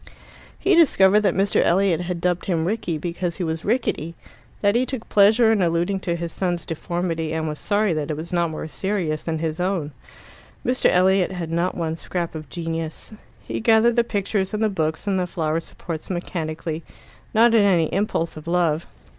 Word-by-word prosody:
He 385 - +2
discovered 210 - +5
that 200 -4 +1
Mr. 195 +1 +2
Elliot 180 -1 +2
had 175 -1 -4
dubbed 180 0 0
him 165 -4 0
Rickie 180 -4 -1
because 170 +1 -3
he 185 - -3
was 160 -1 -3
rickety, 185 - -1 0.5
that 205 -1 +3
he 240 +2 +3
took 255 -3 -5
pleasure 220 +3 +5
in 215 -3 +2
alluding 175 +3 +1
to 175 -2 -2
his 170 -1 -4
son's 175 -3 -2
deformity, 165 -1 -3
and 160 0 -2
was 150 -1 -4
sorry 205 -2 +1
that 155 -1 -3
it 150 - -2
was 165 +3 -6
not 170 -1 +2
more 155 0 -5
serious 175 -3 -2
than 165 -1 -2
his 160 +1 -3
own. 180 -5 -1 0.7
Mr. 250 +1 +3
Elliot 185 +1 +3
had 170 -3 -5
not 170 +2 0
one 160 -2 -2
scrap 170 0 -4
of 155 -3 -8
genius. 165 +2 -5 0.3
He - - -4
gathered 225 0 +4
the 235 - +4
pictures 200 -2 -1
and 215 - -1
the 215 - +3
books 160 -4 -2
and 195 -2 +1
the 180 - -1
flower 160 -2 -1
supports 165 -1 -7
mechanically, 165 -3 -4 0.5
not 230 +1 +6
in 225 - +6
any 180 -5 +4
impulse 195 -4 -1
of 155 +1 -10
love. 170 -2 +1
175 Hz, 190 wpm, -23 LUFS, 165-200 Hz, 0.7 s, not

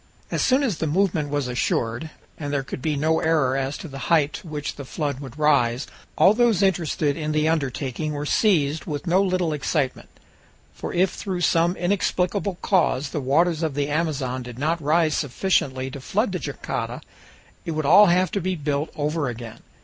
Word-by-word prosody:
As - - 0
soon 265 +2 +3
as 220 - -1
the 160 - 0
movement 160 -2 +1
was 145 -2 -1
assured, 120 +3 -1 0.3
and 145 -2 -5
there 140 -1 0
could 130 - -7
be 150 +2 0
no 160 +3 +1
error 155 -5 +2
as 135 +1 -2
to - - -8
the 135 -2 -8
height 155 -3 +3
to 200 - -8
which 150 -2 -4
the 140 - -7
flood 140 0 -3
would 135 -1 -9
rise, 140 -4 +2 0.3
all 195 - +6
those 225 -4 +3
interested 160 -6 +1
in 155 -1 -3
the 155 0 +2
undertaking 145 -1 -1
were 145 0 -3
seized 155 -6 +2
with 145 +1 -4
no 180 +2 +3
little 185 -4 0
excitement. 145 -1 -2 0.6
For - - -6
if 185 +1 +2
through 185 -2 -4
some 170 +1 +3
inexplicable 185 0 0
cause 155 -7 +2
the 150 - -3
waters 160 +5 +2
of 155 -4 -1
the 145 0 -1
Amazon 145 -5 -1
did 120 -1 -9
not 160 +5 0
rise 155 +1 +2
sufficiently 135 -3 0
to 140 - -8
flood 205 - 0
the 180 - -2
jangada, 135 - -4 0.6
it 165 - -4
would 155 -1 -2
all 200 +8 +8
have 180 +1 +3
to 200 - -1
be 185 +1 -1
built 145 -1 -2
over 150 -1 -1
again. 115 -1 -8
155 Hz, 190 wpm, -23 LUFS, 140-175 Hz, 0.6 s, all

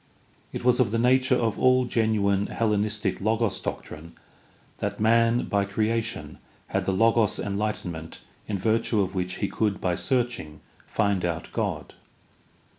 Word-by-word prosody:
It - - -5
was 125 0 +4
of 125 -5 +3
the 115 - 0
nature 130 +2 +3
of 115 -4 0
all 130 0 +4
genuine 105 -4 +1
Hellenistic 105 -3 -1
Logos 110 -1 +1
doctrine 80 +2 -7 0.7
that - - -3
man 115 +2 +3
by 100 -1 +1
creation 110 +3 -2 0.3
had - - -1
the - - +1
Logos 115 +2 +3
enlightenment 100 -5 -3 0.3
in 105 - -2
virtue 110 +2 +1
of 95 0 -2
which 90 -1 -2
he 100 - -1
could 105 -1 -1
by 90 - 0
searching 120 - -2 0.3
find 100 -4 0
out 85 -2 -3
God. - - -3
105 Hz, 140 wpm, -26 LUFS, 100-115 Hz, 0.7 s, was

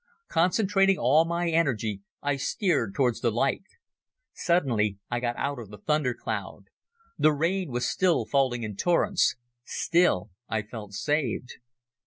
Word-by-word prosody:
Concentrating 195 +2 +3
all 150 +7 +4
my 170 +1 -1
energy 115 -11 0 0.2
I 145 0 +1
steered 135 - 0
towards 125 -4 +1
the 120 - +2
light. 125 +4 0 0.7
Suddenly 115 - +1
I 120 - 0
got 120 0 -2
out 140 -1 -2
of 110 -4 -9
the 105 - -10
thunder 140 +2 0
cloud. - - -5 0.6
The 155 - +5
rain 170 +5 0
was 125 0 -1
still 170 +7 +2
falling 130 -4 +1
in 105 -2 -5
torrents. 175 - +2 0.3
Still, 125 - +1 0.2
I 110 -1 -1
felt 105 -2 -9
saved. 130 +1 -2
135 Hz, 140 wpm, -27 LUFS, 115-170 Hz, 0.7 s, The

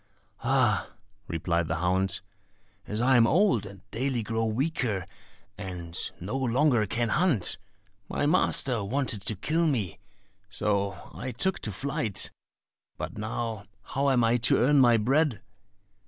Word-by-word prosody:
"Ah," 120 -6 +2 0.4
replied 85 0 -1
the 85 - -1
hound, 95 +4 0 0.7
"as 105 +2 -1
I 130 +1 +5
am 115 -1 +6
old, 160 - +3
and 100 -1 -12
daily 125 +1 -1
grow 115 +1 -1
weaker, 110 - -1 0.5
and 90 -4 -7 0.2
no 100 +8 -4
longer 130 -3 +2
can 115 +4 -1
hunt, 145 - +1 0.5
my - - -1
master 135 - +3
wanted 115 -1 -1
to 110 +3 0
kill 160 - 0
me, 105 - -1 0.5
so 100 -2 -1
I 130 - -5
took 155 +11 0
to 105 - -5
flight; 135 - -1 0.7
but - - -6
now 110 -1 -3 0.2
how 140 +1 0
am 125 -3 +3
I 115 +1 +3
to 120 +1 +4
earn 140 +4 +4
my 120 -3 +6
bread?" 135 +3 +1
115 Hz, 140 wpm, -28 LUFS, 100-135 Hz, 0.7 s, am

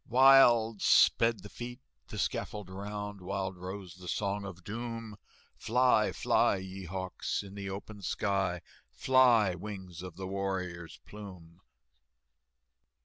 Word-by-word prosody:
Wild 120 -4 +6
sped 115 -1 +4
the - - -8
feet 120 +2 -7 0.3
the - - -8
scaffold 105 -3 -3
round, 105 +1 -6
Wild 95 0 -3
rose 90 0 -7
the 90 0 -12
Song 100 +2 -2
of 90 -3 -9
Doom, 115 0 -6 0.4
"Fly, 125 -2 +3
fly, - - +2
ye 95 0 -7
hawks, 95 +3 -3
in 100 -1 -11
the 100 -1 -5
open 100 +2 -7
sky, 95 -3 -1 0.3
Fly, 115 - +4
wings 95 -2 -8
of 90 -2 -8
the 95 +1 -6
warrior's 95 -3 -4
plume!" 95 -5 -11
100 Hz, 125 wpm, -31 LUFS, 95-110 Hz, 0.4 s, Wild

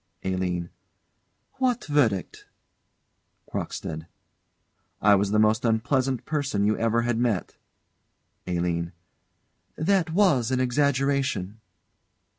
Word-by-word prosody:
ALINE. 90 -2 -2 0.9
What 250 -2 +1
verdict? 120 - 0 1.0
CROCKSTEAD. 80 0 -5 0.9
I 105 0 +5
was 100 0 +2
the 105 - +1
most 110 +1 +3
unpleasant 125 +3 0
person 140 -10 -1
you 105 +1 +2
ever 115 +1 +1
had 120 -1 0
met. 115 -6 -1 0.9
ALINE. 85 -1 -1 0.8
That 175 0 +1
was 160 - +3
an 130 -1 0
exaggeration. 130 -5 0
115 Hz, 90 wpm, -26 LUFS, 100-140 Hz, 1.0 s, I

